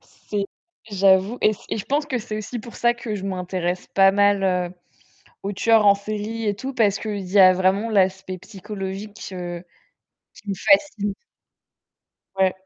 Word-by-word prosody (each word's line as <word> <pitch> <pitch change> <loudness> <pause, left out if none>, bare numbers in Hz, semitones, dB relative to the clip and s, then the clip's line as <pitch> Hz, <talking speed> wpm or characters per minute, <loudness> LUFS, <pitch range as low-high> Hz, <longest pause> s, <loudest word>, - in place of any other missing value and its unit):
C'est 205 -1 -5 0.4
j'avoue 195 +3 +3
et 215 - +4 0.2
et - - -2
je 210 - -4
pense 290 +2 0
que 260 -4 -1
c'est 215 -1 -5
aussi 215 +3 -5
pour 235 +1 -10
ça 240 0 +2
que 235 -3 -5
je 195 -2 -5
m'intéresse 180 -1 -3
pas 195 0 +6
mal, 200 0 +3
heu, 180 -2 0 0.7
aux 200 - -2
tueurs 220 +2 +3
en 200 0 +7
série 215 +2 -4
et 205 -1 0
tout, 265 +7 -6
parce 210 -5 +2
qu'il 205 -4 -4
y 200 - +3
a 185 -1 +8
vraiment 190 +4 +1
l'aspect 190 -2 +1
psychologique, 195 +2 -7
heu, 175 -1 -6 0.7
qui 210 - -16
me - - 0
fascine. 220 -4 +2 1.2
Ouais. 190 -1 +3
200 Hz, 165 wpm, -23 LUFS, 190-215 Hz, 1.2 s, a